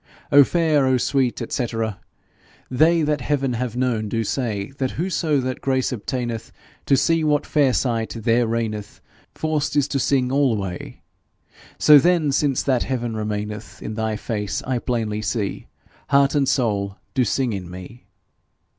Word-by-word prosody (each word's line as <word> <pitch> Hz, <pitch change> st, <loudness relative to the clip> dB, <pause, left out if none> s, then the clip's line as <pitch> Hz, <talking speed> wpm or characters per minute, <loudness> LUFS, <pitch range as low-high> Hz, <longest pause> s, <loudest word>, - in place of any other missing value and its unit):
O 145 Hz, 0 st, +9 dB
fair, 155 Hz, -3 st, +2 dB
O 130 Hz, -1 st, +3 dB
sweet, 130 Hz, 0 st, 0 dB
&c. 125 Hz, -, 0 dB, 1.0 s
They 160 Hz, +5 st, +4 dB
that 150 Hz, -2 st, 0 dB
heaven 135 Hz, -1 st, 0 dB
have 120 Hz, 0 st, -3 dB
known, 120 Hz, -4 st, 0 dB
do 115 Hz, 0 st, -1 dB
say 110 Hz, -3 st, -2 dB
That 130 Hz, -1 st, 0 dB
whoso 165 Hz, -3 st, 0 dB
that 130 Hz, 0 st, -4 dB
grace 130 Hz, -1 st, 0 dB
obtaineth 120 Hz, -1 st, -4 dB, 0.4 s
To 135 Hz, -, +4 dB
see 165 Hz, +4 st, +2 dB
what 150 Hz, -1 st, +1 dB
fair 145 Hz, -4 st, +2 dB
sight 115 Hz, -3 st, -1 dB
there 115 Hz, +1 st, +2 dB
reigneth, 110 Hz, -2 st, -3 dB, 0.4 s
Forced 155 Hz, -1 st, -1 dB
is 145 Hz, -2 st, +3 dB
to 140 Hz, -, 0 dB
sing 130 Hz, -1 st, +1 dB
alway; 110 Hz, -10 st, -1 dB, 0.7 s
So 150 Hz, -1 st, +8 dB
then, 170 Hz, -2 st, +2 dB
since 135 Hz, -1 st, +1 dB
that 130 Hz, -3 st, +1 dB
heaven 120 Hz, -3 st, -2 dB
remaineth 105 Hz, -2 st, -4 dB
In 110 Hz, -, -4 dB
thy 110 Hz, 0 st, -2 dB
face, 105 Hz, -2 st, -3 dB
I 125 Hz, -1 st, -1 dB
plainly 110 Hz, -4 st, -2 dB
see, 105 Hz, -1 st, -3 dB, 0.4 s
Heart 140 Hz, 0 st, +4 dB
and 140 Hz, -3 st, +2 dB
soul 100 Hz, -6 st, 0 dB, 0.2 s
do 130 Hz, -, +2 dB
sing 125 Hz, +1 st, 0 dB
in 95 Hz, -3 st, -5 dB
me. 90 Hz, +4 st, -11 dB
125 Hz, 155 wpm, -22 LUFS, 110-140 Hz, 1.0 s, O